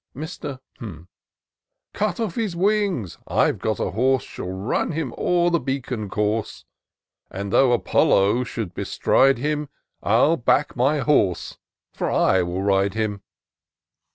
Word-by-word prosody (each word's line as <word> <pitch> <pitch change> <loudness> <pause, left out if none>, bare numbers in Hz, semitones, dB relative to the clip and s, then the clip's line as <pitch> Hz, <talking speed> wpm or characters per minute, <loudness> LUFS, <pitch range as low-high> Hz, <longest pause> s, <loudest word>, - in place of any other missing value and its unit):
Mr. 145 -1 -6 0.2
■ 90 -7 -9 0.4
" - - -62
Cut 205 -2 -1
off 220 -7 -2
his 215 -5 -2
wings, 190 - 0
— - - -43
I've - - +1
got - - -1
a - - -1
horse 130 +5 +2
Shall 90 - -7
run 95 - -2
him 150 -6 -3
o'er 175 -1 +2
the 170 - +2
Beacon 130 -7 -3
Course; 105 +2 -2 0.6
And, 100 +1 -5
though 135 -2 +5
Apollo 115 0 +3
should 110 -7 -5
bestride 135 +8 +2
him, 150 +2 -2 0.3
I'll 125 +10 +3
back 135 +4 +1
my 135 +4 +2
horse 105 - +1 0.2
— - - -42
^for - - -2
I 95 - +3
will 90 +2 -2
ride 100 0 +2
him." 105 -2 -2
125 Hz, 150 wpm, -23 LUFS, 100-150 Hz, 0.6 s, though